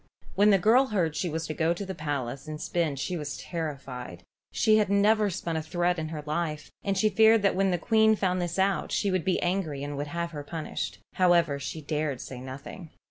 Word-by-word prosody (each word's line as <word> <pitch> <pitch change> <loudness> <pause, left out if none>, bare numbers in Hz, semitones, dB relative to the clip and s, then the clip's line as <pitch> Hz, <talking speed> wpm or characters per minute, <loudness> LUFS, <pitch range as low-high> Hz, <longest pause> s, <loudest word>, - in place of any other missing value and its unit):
When 205 +2 +4
the 200 - +6
girl 230 +8 +4
heard 175 -9 0
she 180 - -1
was 160 +1 -3
to 155 - -4
go 165 +2 +1
to 200 - -5
the 190 - -5
palace 145 -4 -4
and 155 0 -5
spin 165 -4 -1
she 160 +7 -3
was 145 -4 -5
terrified. 140 -7 -6 0.3
She 215 0 +4
had 210 -3 +2
never 210 +1 +3
spun 170 -2 -3
a 160 - 0
thread 175 +2 0
in 155 - -3
her 155 -1 -6
life, 155 0 -3
and 195 -1 0
she 215 - +3
feared 220 +1 +5
that 200 - +3
when 195 +1 +2
the 180 - +1
Queen 220 +4 +4
found 185 -3 0
this 175 0 -3
out 195 +1 +1
she 200 - +1
would 185 -3 0
be 190 -2 +1
angry 175 -6 -1
and 145 0 -4
would 145 +1 -3
have 170 +2 -3
her 145 -3 -6
punished. 160 +2 -4 0.2
However, 170 -6 +3
she 155 +3 -5
dared 150 -3 -2
say 125 -2 -8
nothing. 140 +6 -9
170 Hz, 225 wpm, -28 LUFS, 150-195 Hz, 0.3 s, the